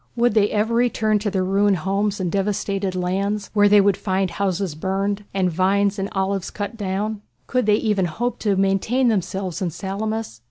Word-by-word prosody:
Would 240 Hz, -1 st, +2 dB
they 210 Hz, -1 st, +3 dB
ever 215 Hz, +2 st, 0 dB
return 225 Hz, -3 st, +2 dB
to 205 Hz, 0 st, -1 dB
their 190 Hz, -2 st, 0 dB
ruined 195 Hz, +1 st, +2 dB
homes 195 Hz, +4 st, -1 dB
and 180 Hz, -3 st, -1 dB
devastated 195 Hz, -1 st, -1 dB
lands, 195 Hz, +3 st, -1 dB
where 205 Hz, -1 st, +5 dB
they 205 Hz, 0 st, +7 dB
would 200 Hz, -1 st, +4 dB
find 190 Hz, -1 st, -1 dB
houses 190 Hz, -2 st, -1 dB
burned, 195 Hz, +5 st, -2 dB
and 185 Hz, -2 st, 0 dB
vines 195 Hz, +3 st, +1 dB
and 195 Hz, +1 st, -2 dB
olives 195 Hz, -1 st, -1 dB
cut 205 Hz, +2 st, -5 dB
down? 205 Hz, +1 st, -3 dB, 0.2 s
Could 250 Hz, -4 st, 0 dB
they 210 Hz, -, +5 dB
even 210 Hz, -4 st, +1 dB
hope 240 Hz, +9 st, -3 dB
to 205 Hz, -3 st, +1 dB
maintain 195 Hz, +7 st, +2 dB
themselves 190 Hz, -2 st, -2 dB
in 180 Hz, -, 0 dB
Salamis? 200 Hz, -, -4 dB
200 Hz, 185 wpm, -22 LUFS, 190-210 Hz, 0.2 s, they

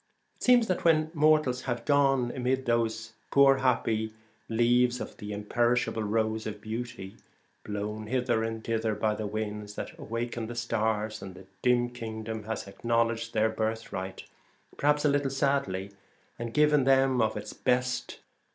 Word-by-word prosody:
It -, -, -35 dB
seems 245 Hz, -2 st, +6 dB
that 185 Hz, -4 st, -1 dB
when 155 Hz, -1 st, +3 dB
mortals 150 Hz, -5 st, +3 dB
have 120 Hz, -1 st, -2 dB
gone 135 Hz, -4 st, +3 dB
amid 130 Hz, +1 st, 0 dB
those 115 Hz, -1 st, 0 dB, 0.2 s
poor 135 Hz, -1 st, +6 dB
happy 110 Hz, -4 st, 0 dB, 0.3 s
leaves 120 Hz, +2 st, +3 dB
of -, -, -6 dB
the 105 Hz, 0 st, -7 dB
Imperishable 120 Hz, +3 st, 0 dB
Rose 110 Hz, +1 st, 0 dB
of 105 Hz, -1 st, -5 dB
Beauty, 110 Hz, -2 st, -6 dB, 0.5 s
blown 105 Hz, +1 st, -4 dB
hither 125 Hz, -2 st, +1 dB
and 115 Hz, 0 st, -4 dB
thither 110 Hz, -1 st, -1 dB
by 105 Hz, +1 st, +1 dB
the 105 Hz, 0 st, -4 dB
winds 105 Hz, -1 st, -4 dB
that -, -, -6 dB
awakened 115 Hz, 0 st, -4 dB
the 120 Hz, -, -6 dB
stars, 110 Hz, -2 st, -1 dB
the 95 Hz, -1 st, -10 dB, 0.2 s
dim 120 Hz, -1 st, +3 dB
kingdom 110 Hz, -2 st, -6 dB
has 110 Hz, -2 st, -4 dB
acknowledged 115 Hz, +2 st, -1 dB
their 110 Hz, +1 st, +3 dB
birthright, 110 Hz, -4 st, -3 dB, 0.5 s
per 145 Hz, -, -1 dB
haps 150 Hz, 0 st, +3 dB
a -, -, +6 dB
little 140 Hz, -1 st, +2 dB
sadly, 135 Hz, -9 st, 0 dB, 0.5 s
and 115 Hz, -1 st, -5 dB
given 150 Hz, -2 st, +4 dB
them 135 Hz, -2 st, +4 dB
of 110 Hz, -1 st, +1 dB
its -, -, -6 dB
best. 125 Hz, 0 st, -1 dB
115 Hz, 150 wpm, -29 LUFS, 110-130 Hz, 0.5 s, seems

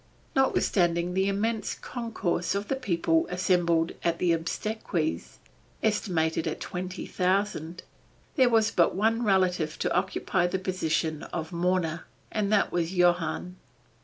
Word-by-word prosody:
Notwithstanding 175 Hz, -9 st, +2 dB
the 190 Hz, +1 st, +1 dB
immense 215 Hz, +3 st, -1 dB
concourse 220 Hz, -8 st, -2 dB
of 200 Hz, +1 st, -2 dB
people 165 Hz, -6 st, +1 dB
assembled 175 Hz, -2 st, +2 dB
at 170 Hz, -1 st, +1 dB
the 175 Hz, 0 st, +2 dB
obsequies, 165 Hz, -, -2 dB, 0.5 s
estimated 170 Hz, -7 st, 0 dB
at -, -, -3 dB
twenty 185 Hz, 0 st, -5 dB
thousand, 185 Hz, -2 st, -1 dB, 0.5 s
there 260 Hz, -5 st, +5 dB
was 225 Hz, -1 st, +3 dB
but 170 Hz, -5 st, +3 dB
one 225 Hz, +4 st, +2 dB
relative 180 Hz, -6 st, +1 dB
to -, -, -1 dB
occupy 180 Hz, -2 st, 0 dB
the 190 Hz, -, -1 dB
position 165 Hz, -4 st, -1 dB
of 160 Hz, 0 st, -5 dB
mourner, 170 Hz, -2 st, 0 dB, 0.2 s
and 210 Hz, -2 st, -1 dB
that 210 Hz, -2 st, +3 dB
was 175 Hz, +1 st, -1 dB
Johann. 175 Hz, 0 st, +1 dB
180 Hz, 125 wpm, -27 LUFS, 170-200 Hz, 0.5 s, there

